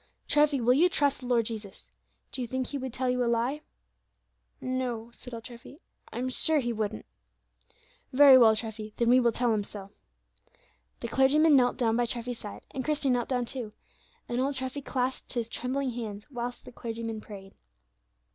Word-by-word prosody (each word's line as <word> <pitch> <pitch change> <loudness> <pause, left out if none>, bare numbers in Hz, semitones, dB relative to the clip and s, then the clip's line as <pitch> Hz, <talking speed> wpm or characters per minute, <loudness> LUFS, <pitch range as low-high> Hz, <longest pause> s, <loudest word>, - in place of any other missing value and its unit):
Treffy, 295 -2 +3
will 245 +1 +4
you 335 +7 +5
trust 285 -5 +1
the 250 - -8
Lord 235 -2 +2
Jesus? 215 -3 -7 0.4
Do 260 - -5
you 245 - -2
think 260 +2 -2
He 285 - -4
would 260 -1 -4
tell 255 +1 -2
you 250 0 +1
a - - 0
lie?" 240 +6 0 1.0
"No," 250 -3 -3
said 250 - -12
old 230 -1 -7
Treffy; 240 +3 -11 0.3
"I'm 250 +1 -3
sure 310 +5 +2
He 240 -3 -1
wouldn't." 215 0 -3 1.1
"Very 275 0 +8
well, 225 -4 +7
Treffy, 215 -1 -5
then 235 -1 +2
we 250 +1 +7
will 240 -2 +3
tell 240 0 +1
Him 210 -1 0
so." 200 -1 -8 1.1
The - - -3
clergyman 295 +3 +4
knelt 245 -2 +3
down 230 -2 +1
by 240 0 +1
Treffy's 235 0 -4
side, 205 - -9
and 265 - -4
Christie 295 -2 0
knelt 245 -2 0
down 250 -2 0
too, 235 -4 -6 0.5
and 240 +1 -1
old 275 +1 0
Treffy 260 +2 -2
clasped 260 -1 -3
his 235 -3 -2
trembling 255 +3 -2
hands 220 -3 -6
whilst 245 -1 -5
the - - -10
clergyman 230 -2 -5
prayed. 195 -2 -11
245 Hz, 185 wpm, -28 LUFS, 230-260 Hz, 1.1 s, Very